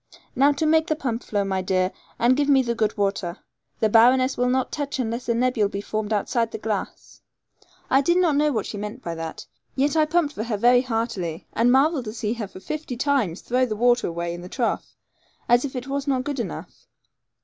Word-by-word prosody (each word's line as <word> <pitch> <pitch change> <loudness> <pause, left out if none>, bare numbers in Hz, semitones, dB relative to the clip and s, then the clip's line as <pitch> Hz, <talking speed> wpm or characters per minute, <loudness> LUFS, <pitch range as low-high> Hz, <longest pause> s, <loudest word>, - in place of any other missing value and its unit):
Now 280 +2 +5
make 320 +1 +3
the 310 - +1
pump 245 -6 -3
to - - -18
flow, 205 -2 0
my 190 -1 -1
dear, 185 0 0 0.3
and 245 +2 +4
give 290 +1 +1
me 270 -2 +5
the 235 -1 -1
good 220 -2 -1
water. 195 -4 -1 0.4
The 220 - +4
baroness 255 +4 +5
will 250 0 +1
not 260 0 0
touch 290 -2 -3
unless 240 0 -3
a 235 - +2
nebule 240 -4 +1
be 200 - -4
formed 215 +1 -3
outside 225 +2 0
the - - -6
glass.' 215 -2 -5 0.7
I 270 - +4
did 345 +5 +2
not 345 -5 +3
know 300 +1 +3
what 220 -6 -1
she 205 - -6
meant 210 +5 -6
by 170 - -3
that; 165 -1 -6 0.3
yet 280 +3 +1
I 310 -1 +4
pumped 305 -1 +1
for 215 - -4
her 225 -3 -2
very 245 +3 +5
heartily, 225 -9 -3
and 235 +2 +3
marvelled 275 0 +3
to 215 - -5
see 220 -1 -2
her 230 -4 -5
for 185 - -12
fifty 300 +3 -5
times 245 - 0
throw 255 +1 +1
the 215 - -3
water 245 +2 +3
away 170 0 -3
in 175 - -7
the 180 - -9
trough, 240 +1 -2 0.5
as 240 +2 +4
if 270 - -6
it 250 0 -4
was 280 +1 -3
not 260 -2 +1
good 285 -1 -3
enough. 235 - -7
240 Hz, 225 wpm, -24 LUFS, 210-270 Hz, 0.7 s, Now